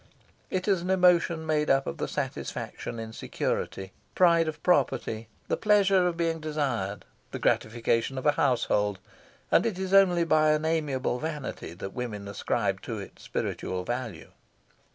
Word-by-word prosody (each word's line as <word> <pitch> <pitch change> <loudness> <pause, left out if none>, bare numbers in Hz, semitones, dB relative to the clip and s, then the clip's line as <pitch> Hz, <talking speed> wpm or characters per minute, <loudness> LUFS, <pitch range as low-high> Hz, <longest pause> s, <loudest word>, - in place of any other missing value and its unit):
It 185 +1 -2
is 195 -4 +3
an 180 - -4
emotion 175 -3 +3
made 155 -1 +1
up 135 0 +3
of - - -4
the - - -2
satisfaction 115 - -4
in 110 0 -6
security, 95 -3 -3 0.2
pride 170 -2 +5
of 155 - -5
property, 120 -9 +1 0.2
the - - +1
pleasure 195 -3 +4
of 170 -1 -2
being 165 -1 0
desired, 130 -11 -2 0.2
the - - -5
gratification 115 +3 0
of 130 - -4
a 150 - +6
household, 115 -9 +1 0.5
and - - +5
it 225 -5 -1
is 190 0 -3
only 180 -3 +6
by 155 -2 +4
an 155 +1 -1
amiable 145 -6 0
vanity 150 - -5
that 95 +2 -7
women 105 -5 -5
ascribe 100 - -1
to - - -5
it - - -9
spiritual 90 0 -3
value. 120 -5 -5
150 Hz, 155 wpm, -28 LUFS, 115-170 Hz, 0.5 s, a